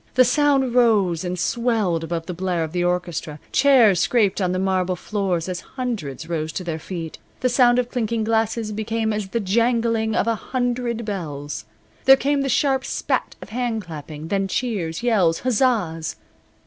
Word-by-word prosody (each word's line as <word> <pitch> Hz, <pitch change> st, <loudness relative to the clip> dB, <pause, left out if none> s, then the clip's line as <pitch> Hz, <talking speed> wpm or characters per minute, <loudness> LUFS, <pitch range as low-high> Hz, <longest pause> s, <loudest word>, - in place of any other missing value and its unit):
The 255 Hz, 0 st, +6 dB
sound 270 Hz, -1 st, +2 dB
rose 205 Hz, -9 st, +3 dB
and 180 Hz, 0 st, -3 dB
swelled 215 Hz, -6 st, 0 dB
above 165 Hz, 0 st, -3 dB
the 180 Hz, -, -5 dB
blare 180 Hz, -1 st, -1 dB
of 160 Hz, -, -5 dB
the 175 Hz, 0 st, -1 dB
orchestra. 175 Hz, -4 st, -2 dB
Chairs 250 Hz, -9 st, +5 dB
scraped 200 Hz, +1 st, +2 dB
on 180 Hz, -1 st, +1 dB
the 185 Hz, -, -1 dB
marble 185 Hz, -1 st, 0 dB
floor 195 Hz, -1 st, -1 dB
as 180 Hz, +2 st, -4 dB, 0.2 s
hundreds 205 Hz, -, -4 dB
rose 160 Hz, -2 st, -2 dB
to 185 Hz, -, -4 dB
their 165 Hz, -2 st, -3 dB
feet. 165 Hz, -1 st, -6 dB, 0.2 s
The 255 Hz, -, +2 dB
sound 245 Hz, -1 st, +4 dB
of 245 Hz, -1 st, 0 dB
clinking 230 Hz, -2 st, -1 dB
glasses 225 Hz, 0 st, 0 dB
became 220 Hz, +1 st, -1 dB
as 210 Hz, -2 st, -3 dB
the 230 Hz, +4 st, -2 dB
jangling 230 Hz, +1 st, +1 dB
of -, -, +2 dB
a 230 Hz, -, +2 dB
hundred 240 Hz, 0 st, -2 dB
bells. 145 Hz, -, -5 dB, 0.4 s
There 270 Hz, 0 st, +8 dB
came 285 Hz, +1 st, +1 dB
the 275 Hz, -, -1 dB
sharp 270 Hz, -1 st, +2 dB
spat -, -, -2 dB
of -, -, -12 dB
hand 230 Hz, -1 st, -2 dB
clapping, 155 Hz, -1 st, -8 dB
then 195 Hz, 0 st, 0 dB
cheers, 190 Hz, -6 st, -2 dB
yells, 190 Hz, -9 st, +2 dB
huzzas. 215 Hz, -10 st, 0 dB
210 Hz, 175 wpm, -22 LUFS, 175-240 Hz, 0.4 s, There